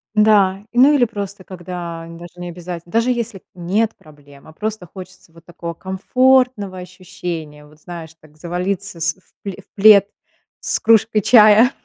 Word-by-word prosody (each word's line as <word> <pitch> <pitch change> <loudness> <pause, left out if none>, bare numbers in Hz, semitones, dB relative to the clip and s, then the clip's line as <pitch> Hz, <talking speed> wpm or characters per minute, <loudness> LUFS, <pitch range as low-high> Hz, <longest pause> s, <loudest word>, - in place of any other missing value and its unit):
Да, 205 -2 +3
ну, 265 +5 +5
или 260 -4 +4
просто, 200 -3 -7
когда 175 -2 -7
даже 170 +1 -11
необязате 175 -1 -7
даже, 230 +4 +1
если 235 -5 -4
нет 195 +6 -1
проблем, 145 -2 -18
а 155 - -14
просто 215 -1 -5
хочется 185 -2 -12
вот 165 0 -19
такого 170 -1 -7
комфортного 220 +1 +1
ощущения, 175 -4 -8
вот 150 +1 -20
знаешь, 165 -1 -10
так 155 -1 -21
завалиться 180 +2 -4
с 165 +1 +1 0.3
в 200 - -4
в 195 +1 -13
плед 200 -1 +7 0.5
с - - 0
кружкой 220 -1 +3
чая, 215 +2 +6
185 Hz, 145 wpm, -19 LUFS, 170-215 Hz, 0.5 s, плед